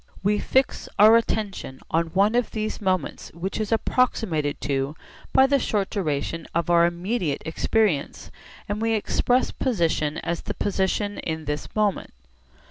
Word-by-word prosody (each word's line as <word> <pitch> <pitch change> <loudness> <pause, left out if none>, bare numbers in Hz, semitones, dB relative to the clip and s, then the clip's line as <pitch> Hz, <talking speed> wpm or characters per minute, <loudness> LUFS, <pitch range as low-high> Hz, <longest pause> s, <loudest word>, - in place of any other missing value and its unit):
We 205 +1 +2
fix 265 0 0
our 215 +2 +8
attention 210 -11 -1
on 165 +1 +2
one 195 +6 +2
of 245 0 +1
these 215 0 -4
moments 185 -6 -1
which 185 +5 -4
is 215 0 -2
approximated 220 - +1
to 140 +1 -1 0.4
by 265 - +6
the 280 +1 +3
short 205 -5 -1
duration 165 -3 -2
of 170 0 +1
our 170 0 +6
immediate 175 -2 -2
experience, 165 -1 0 0.4
and 205 +2 -3
we 225 0 +1
express 245 +3 +1
position 165 - 0
as 170 0 -3
the - - -5
position 205 +1 -1
in 160 -1 -4
this 150 0 -4
moment. 210 - 0
195 Hz, 145 wpm, -24 LUFS, 160-220 Hz, 0.4 s, our